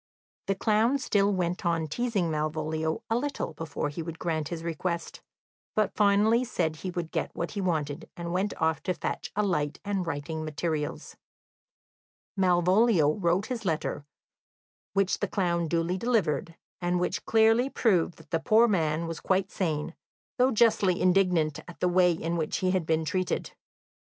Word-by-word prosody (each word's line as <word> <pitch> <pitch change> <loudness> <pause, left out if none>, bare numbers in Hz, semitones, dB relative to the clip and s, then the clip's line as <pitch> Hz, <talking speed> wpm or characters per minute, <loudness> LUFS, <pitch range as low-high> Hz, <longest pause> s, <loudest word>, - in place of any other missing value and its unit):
The 195 - +1
clown 220 +6 +2
still 205 -6 +2
went 180 -2 -1
on 165 -2 +1
teasing 195 0 -1
Malvolio 155 +1 -2
a 225 - 0
little 270 - -2
before 150 -1 -3
he 145 +3 -5
would 165 0 -6
grant 160 -3 -2
his 165 -1 -5
request, 170 +1 -3 0.5
but 215 -2 +1
finally 210 +3 +4
said 160 -10 -1
he 185 - -5
would 175 -2 -4
get - - -1
what 170 - -3
he 200 - -3
wanted, 155 -6 -2
and 170 0 -4
went 190 +3 -1
off 160 -1 +1
to 185 - -1
fetch - - -4
a 210 - +2
light 150 -7 -1
and 195 -3 -1
writing 160 +1 -3
materials. 155 -1 -3 1.2
Malvolio 180 -2 +4
wrote 175 +1 +1
his 245 -4 -4
letter, 160 -5 -2 0.9
which 195 -1 +1
the - - 0
clown 170 -4 0
duly 170 +3 0
delivered, 200 -8 0 0.3
and 175 0 +1
which 180 - -1
clearly 225 +3 +4
proved 185 -10 +1
that 160 -2 -18
the 165 - +1
poor 220 +8 +5
man 165 -5 +1
was 165 -1 -5
quite 190 0 0
sane, 160 -3 -2 0.5
though 255 +1 +5
justly 215 -6 +3
indignant 180 -5 +2
at 175 - -11
the 180 - +2
way 180 0 +4
in 170 +1 -2
which 155 -2 -1
he 185 -1 +1
had 185 -4 0
been 160 0 +1
treated. 185 +3 -1
175 Hz, 165 wpm, -28 LUFS, 160-200 Hz, 1.2 s, poor